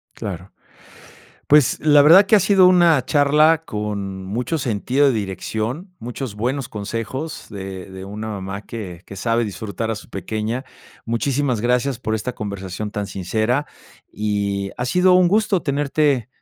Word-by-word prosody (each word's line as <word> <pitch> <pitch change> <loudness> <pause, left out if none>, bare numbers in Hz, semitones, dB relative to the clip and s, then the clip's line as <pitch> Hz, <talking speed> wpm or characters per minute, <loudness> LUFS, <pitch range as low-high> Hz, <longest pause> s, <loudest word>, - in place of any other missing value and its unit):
Claro, 95 -1 -7 0.9
pues, 145 -4 +4
la 145 -1 +6
verdad 175 +7 +8
que 215 - +6
ha - - +4
sido 190 0 +5
una 175 -6 +5
charla 150 +2 +4
con 100 -5 -4
mucho 125 - -2
sentido 130 +3 +1
de 135 - +3
dirección. 110 - -4
Muchos 125 -1 -6
buenos 125 +4 -2
consejos 115 +9 -5
de 95 -1 -7
de 95 0 -8
una 105 +3 -6
mamá 100 -1 -5
que 95 -7 -7
que 100 - -10
sabe 115 +4 0
disfrutar 105 +2 -4
a - - 0
su 105 - -11
pequeña. 110 +6 -3 0.4
Muchísimas 125 0 0
gracias 125 +1 +1
por 110 -2 -2
esta 115 +3 -3
conversación 100 0 -5
tan 105 0 -3
sincera, 110 +9 -1 0.5
y 100 -2 -2
ha 125 - -2
sido 180 +8 +4
un 180 -1 +5
gusto 210 -2 +2
tenerte 140 -3 +1
115 Hz, 150 wpm, -21 LUFS, 100-145 Hz, 0.9 s, verdad